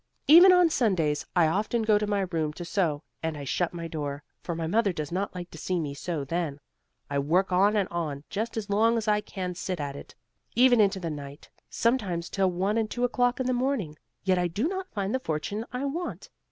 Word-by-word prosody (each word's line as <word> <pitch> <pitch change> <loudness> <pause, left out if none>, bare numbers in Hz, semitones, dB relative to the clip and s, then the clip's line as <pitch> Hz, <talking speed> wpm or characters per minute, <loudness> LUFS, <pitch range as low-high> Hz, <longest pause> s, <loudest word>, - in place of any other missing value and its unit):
Even 345 +5 +9
on 360 -1 +6
Sundays 180 - +1
I 175 -2 +5
often 215 +7 0
go 215 -1 +4
to 210 - -2
my 205 -1 +1
room 165 -5 -1
to 175 - -7
sew, 165 -5 0 0.2
and 160 -2 -2
I 145 - -6
shut 170 +6 -1
my 170 -1 -5
door, 145 -2 -4 0.2
for 170 - -4
my 165 0 -3
mother 205 +4 +2
does 155 -3 -5
not 190 +2 -2
like 180 -1 -7
to 160 - -10
see 180 +2 -1
me 145 -3 -3
sew 150 0 -4
then. 160 -2 -2 0.5
I 140 0 -1
work 175 +7 +1
on 200 +4 +4
and 200 -3 +2
on, 155 -5 -3
just 225 +3 -3
as 215 -2 -3
long 225 +3 +3
as 225 -1 -3
I 210 0 +3
can 185 -3 -5
sit 180 0 -4
at 140 -1 -4
it, - - -11 0.4
even 245 -1 +6
into 200 -1 +2
the 170 -3 -3
night; 145 0 -9 0.2
sometimes 200 -8 0
till 190 -2 +2
one 195 +5 0
and 220 -1 -1
two 245 - -3
o'clock 245 0 +1
in 260 - -1
the 255 - +1
morning; 245 - -1 0.3
yet 185 -1 +2
I 175 - +1
do 205 - -1
not 380 +1 -4
find 200 -1 -2
the 260 - +1
fortune 205 +4 -3
I 250 +3 -3
want. 335 +6 -4
190 Hz, 230 wpm, -27 LUFS, 160-225 Hz, 0.5 s, Even